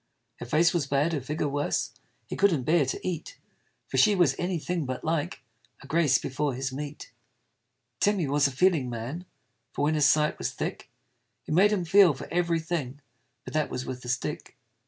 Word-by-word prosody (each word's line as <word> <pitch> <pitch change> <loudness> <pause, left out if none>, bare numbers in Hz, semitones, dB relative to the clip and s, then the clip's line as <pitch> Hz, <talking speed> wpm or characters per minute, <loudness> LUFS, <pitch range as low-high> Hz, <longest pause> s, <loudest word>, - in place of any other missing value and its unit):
Her 120 - -7
face 165 +6 +3
was 165 -6 0
bad, 145 +4 +1
her 145 - -1
figure 150 +3 -2
worse, 145 +1 -1 0.3
He - - -6
couldn't 175 -9 +2
bear 155 0 +3
to 130 - -4
eat: 170 -3 -5 0.5
For - - -3
she 210 -1 +5
was 170 -8 +3
any 175 0 -1
thing 165 -2 -3
but 130 -1 -4
like 160 -1 -2 0.4
A - - -12
Grace 145 -2 +3
before 135 0 -2
his 135 +1 -3
meat. 145 0 -7 0.9
Tim 205 0 +3
he 170 -6 -1
was 145 +1 +3
a - - -4
feeling 145 -2 +2
man: 125 +10 -6 0.5
For - - -2
when 150 +2 +2
his 150 -3 +4
sight 150 0 +2
was - - -2
thick, - - -5 0.6
It - - -3
made 195 +5 +5
him 190 -4 0
feel 185 -3 +6
for - - -8
every 170 -1 +1
thing 155 -5 -4 0.5
But - - -8
that 155 -1 0
was 125 - -4
with 125 -1 -6
a 125 - -7
stick. 130 +4 -3
150 Hz, 200 wpm, -27 LUFS, 135-170 Hz, 0.9 s, feel